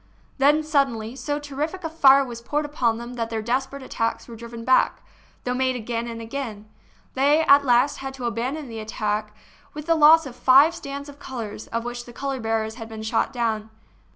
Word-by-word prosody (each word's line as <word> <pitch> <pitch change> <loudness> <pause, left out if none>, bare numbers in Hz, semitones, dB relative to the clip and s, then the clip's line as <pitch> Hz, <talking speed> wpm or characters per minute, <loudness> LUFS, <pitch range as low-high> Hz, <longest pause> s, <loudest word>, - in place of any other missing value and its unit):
Then, 295 +3 +4
suddenly, 265 -7 0
so 290 +2 -3
terrific 295 +5 -4
a 325 - -2
fire 275 -4 +6
was 235 -2 -8
poured 295 +5 -1
upon 245 -6 0
them 235 +1 -7
that 230 -2 -3
their 220 -1 -3
desperate 265 +4 -2
attacks 230 -3 -2
were 235 - -9
driven 230 0 -9
back, 260 0 +3 0.4
though 250 - -1
made 260 0 0
again 235 0 -3
and 230 -1 -6
again. 225 -3 -6 0.5
They 285 +4 +3
at 285 -2 +6
last 250 +2 +3
had 270 0 -6
to 255 -2 -6
abandon 255 +6 -3
the 225 -2 -7
attack 215 -1 -3 0.4
with 300 0 -6
the 335 - +3
loss 320 +1 +7
of 255 -3 -8
five 270 +6 +6
stands 280 -3 -7
of 285 0 -12
colors, 230 -6 -7
of 230 0 -3
which 240 0 -5
the 240 - -12
color 275 +2 -3
bearers 225 0 -2
had 225 - -7
been 220 -1 -7
shot 220 +1 0
down. 225 -3 -2
250 Hz, 200 wpm, -24 LUFS, 230-280 Hz, 0.5 s, loss